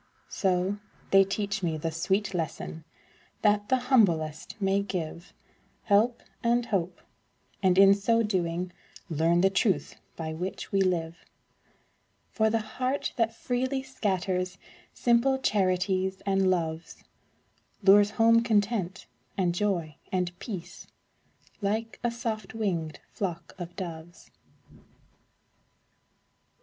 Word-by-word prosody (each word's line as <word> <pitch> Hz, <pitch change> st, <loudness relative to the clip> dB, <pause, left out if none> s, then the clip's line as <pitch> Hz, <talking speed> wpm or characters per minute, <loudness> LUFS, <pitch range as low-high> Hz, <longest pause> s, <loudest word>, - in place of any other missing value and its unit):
So, 190 Hz, +1 st, 0 dB, 0.3 s
they 195 Hz, 0 st, +7 dB
teach 200 Hz, 0 st, -2 dB
me 165 Hz, -3 st, -1 dB
the 165 Hz, +1 st, -2 dB
sweet 190 Hz, +5 st, 0 dB
lesson, 160 Hz, -1 st, -4 dB, 0.6 s
That 205 Hz, -1 st, +3 dB
the 260 Hz, -, +4 dB
humblest 195 Hz, -, +1 dB
may 195 Hz, 0 st, +2 dB
give 175 Hz, -2 st, -5 dB, 0.5 s
Help 225 Hz, +4 st, +2 dB, 0.2 s
and 235 Hz, 0 st, +2 dB
hope, 180 Hz, -5 st, -2 dB, 0.6 s
and 185 Hz, -2 st, +3 dB
in 195 Hz, 0 st, +8 dB
so 230 Hz, +3 st, +2 dB
doing, 180 Hz, -3 st, -1 dB, 0.4 s
Learn 165 Hz, +3 st, +3 dB
the 195 Hz, +1 st, +4 dB
truth 190 Hz, -6 st, 0 dB, 0.2 s
by 160 Hz, -1 st, -4 dB
which 180 Hz, +4 st, -5 dB
we 195 Hz, -, +2 dB
live; 170 Hz, -3 st, -1 dB, 1.1 s
For 220 Hz, -1 st, +2 dB
the 225 Hz, 0 st, +1 dB, 0.2 s
heart 260 Hz, +3 st, 0 dB
that 230 Hz, -1 st, +1 dB
freely 260 Hz, +2 st, -1 dB
scatters 190 Hz, -7 st, -2 dB, 0.3 s
Simple 245 Hz, +3 st, +3 dB
charities 190 Hz, -4 st, 0 dB
and 195 Hz, -1 st, +2 dB
loves, 165 Hz, -2 st, -2 dB, 0.8 s
Lures 200 Hz, +1 st, +7 dB
home 230 Hz, +2 st, +4 dB
content, 205 Hz, -4 st, 0 dB, 0.3 s
and 180 Hz, -3 st, +1 dB
joy, 175 Hz, -6 st, -1 dB
and 180 Hz, -1 st, 0 dB
peace, 190 Hz, -7 st, -7 dB, 0.7 s
Like 220 Hz, +3 st, -2 dB
a 240 Hz, -, +2 dB
soft 225 Hz, -3 st, -4 dB
winged 170 Hz, -8 st, -2 dB
flock 175 Hz, -4 st, -4 dB
of 175 Hz, 0 st, -7 dB
doves. 170 Hz, -2 st, -8 dB
195 Hz, 115 wpm, -28 LUFS, 175-215 Hz, 1.1 s, in